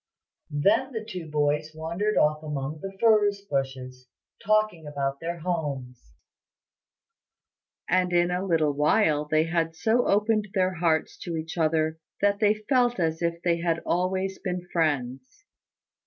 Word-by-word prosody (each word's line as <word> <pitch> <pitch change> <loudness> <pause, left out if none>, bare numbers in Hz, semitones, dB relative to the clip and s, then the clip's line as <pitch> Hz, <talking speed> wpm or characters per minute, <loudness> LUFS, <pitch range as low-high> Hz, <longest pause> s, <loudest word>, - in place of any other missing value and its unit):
Then 240 +6 +3
the 220 -1 -4
two 180 -7 -6
boys 150 +1 0
wandered 170 +7 -2
off 155 0 +3
among 150 0 -4
the 195 0 -7
furze 210 -3 +4
bushes, 130 -6 -4 0.4
talking 215 -6 +1
about 140 -1 -2
their 170 +1 -4
homes; 145 -8 -4 1.7
and 180 -1 +2
in 175 0 +2
a 180 +1 -1
little 165 -5 +2
while 150 +1 +2
they 155 +1 +2
had 165 0 -1
so 220 +8 +1
opened 210 +1 +2
their 185 -1 +2
hearts 165 -2 0
to 170 -2 -5
each 160 +1 -5
other, 160 -1 +1 0.2
that 200 0 +2
they 215 0 +2
felt 245 -4 +2
as 160 -1 0
if 170 0 -2
they 170 -1 +2
had 165 -1 0
always 190 +2 -1
been 180 -1 -4
friends. 155 - -1
170 Hz, 140 wpm, -26 LUFS, 155-200 Hz, 1.7 s, furze